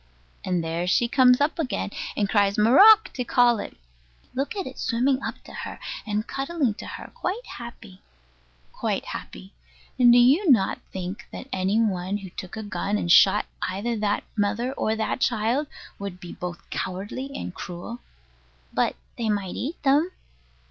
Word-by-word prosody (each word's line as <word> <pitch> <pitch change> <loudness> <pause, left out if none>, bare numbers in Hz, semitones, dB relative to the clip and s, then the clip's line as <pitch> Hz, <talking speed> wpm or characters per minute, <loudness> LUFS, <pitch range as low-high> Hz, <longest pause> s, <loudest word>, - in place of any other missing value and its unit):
And 180 -2 0
there 165 +2 -2
she 235 +6 +3
comes 250 0 +5
up 290 +3 +1
again, 255 -8 -2 0.3
and 205 - +2
cries 200 -1 +2
"marrock" 395 - +7
to 250 - -2
call 240 -2 +4
it. - - -7 0.6
Look 275 +8 -2
at 390 -3 -3
it 260 - -8
swimming 255 +3 +1
up - - -5
to - - -13
her, - - -6 0.3
and 210 +1 -1
cuddling 275 -3 -1
to - - -7
her, - - -8
quite 425 +7 -3
happy. 230 -5 -10 0.7
Quite - - -2
happy. - - -8 0.5
And 245 -1 +7
do 240 - +7
you 280 +10 +5
not 220 -8 +4
think 185 +1 -6
that - - -8
any 190 +3 +1
one 195 -3 0
who 195 -3 -9
took 185 +4 -8
a 220 - -4
gun 205 0 -2
and 175 - -1
shot 195 +4 +6 0.2
either 210 +6 -2
that 210 -1 0
mother 220 +5 0
or 220 -4 0
that 220 +3 -2
child 240 +5 +1 0.3
would 200 -2 -6
be 175 -1 -9
both 175 -1 -7
cowardly 205 +9 -4
and 185 - -5
cruel? 180 +9 -7 0.7
But - - +1 0.2
they 225 -2 0
might 200 -3 -1
eat 305 +6 -5
them. 290 +5 +4
220 Hz, 170 wpm, -25 LUFS, 195-260 Hz, 0.7 s, marrock